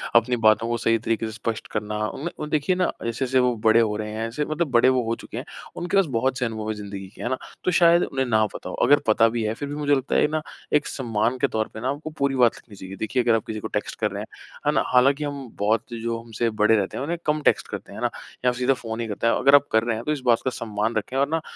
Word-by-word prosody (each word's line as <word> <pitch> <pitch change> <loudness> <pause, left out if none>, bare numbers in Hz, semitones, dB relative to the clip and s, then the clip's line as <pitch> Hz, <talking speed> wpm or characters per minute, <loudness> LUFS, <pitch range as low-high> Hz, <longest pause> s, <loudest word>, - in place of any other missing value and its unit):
अपनी 120 +1 +4
बातों 110 +1 +4
को 120 0 0
सही 115 0 +2
तरीके 115 0 0
से 110 - -4
स्पष्ट 115 0 -4
करना 105 0 -3
उनमें 150 - -5
और 150 - -4
देखिए 150 +4 +1
ना, 180 0 +1
जैसे-जैसे 130 +3 0
वो 125 -1 +2
बड़े 110 +1 +6
हो 110 -2 +2
रहे 105 0 -4
हैं 110 +1 -3
ऐसे 145 +6 -2
मतलब 155 +3 -1
बड़े 120 +1 +5
वो 130 -1 +2
हो 115 +1 0
चुके - - -9
हैं। - - -5 0.3
उनके 180 +3 -1
पास 195 - +5
बहुत 130 +2 0
से 125 - +1
अनुभव 110 -2 -4
है - - 0
ज़िंदगी 100 -2 -7
के, - - -11
है 120 - -2
ना? 130 - 0 0.3
तो 185 - +1
शायद 170 0 +5
उन्हें 135 -1 -1
ना 110 -3 +3
पता - - -7
हो। - - -5
अगर 145 0 +6
पता 110 +1 +5
भी 115 0 -2
है 110 0 0
फिर 145 +5 -5
भी 145 - -4
मुझे 145 -1 +2
लगता 135 0 -2
है - - +4
ना, 155 +1 -2 0.3
एक 150 0 +3
सम्मान 115 -1 -1
के - - +2
तौर 110 0 -1
पे 110 - -7
ना 130 - -1
आपको 145 +3 -4
पूरी 140 -1 +1
बात 120 -3 +4
लिखनी 105 - -15
चाहिए। 95 0 -9
देखिए, 120 +5 -1
अगर 115 -1 +4
आप 110 - -2
किसी 110 -1 -4
को - - -5
टेक्स्ट - - -4
कर - - 0
रहे - - -4
हैं। - - -7 0.4
है - - +5
ना? - - +2
हालाँकि 135 +4 +4
हम 140 -2 -5
बहुत 110 +3 0
जो 115 0 -3
हमसे 115 0 -2
बड़े 110 +1 +5
रहते 100 -3 -1
हैं - - -3
उन्हें 170 +4 -2
कम 150 0 +1
टेक्स्ट - - +2
करते - - -7
हैं, - - -9
है - - -5
ना? - - +2 0.4
या 125 - +5
फिर 125 - -7
सीधा 125 +2 +3
फ़ोन 115 -3 -6
ही 115 - -3
करते 110 +2 -2
हैं। 115 - +4
अगर 140 +1 +5
आप 145 0 +4
कर 110 0 +3
रहे 115 -1 0
हैं, 110 - -5
तो 150 - 0
इस 150 -3 -2
बात 120 -2 +4
का - - +3
सम्मान 110 -1 -2
रखें 110 +5 -2
और 140 +1 +3
ना, 165 +1 0
120 Hz, 300 wpm, -24 LUFS, 110-140 Hz, 0.4 s, बड़े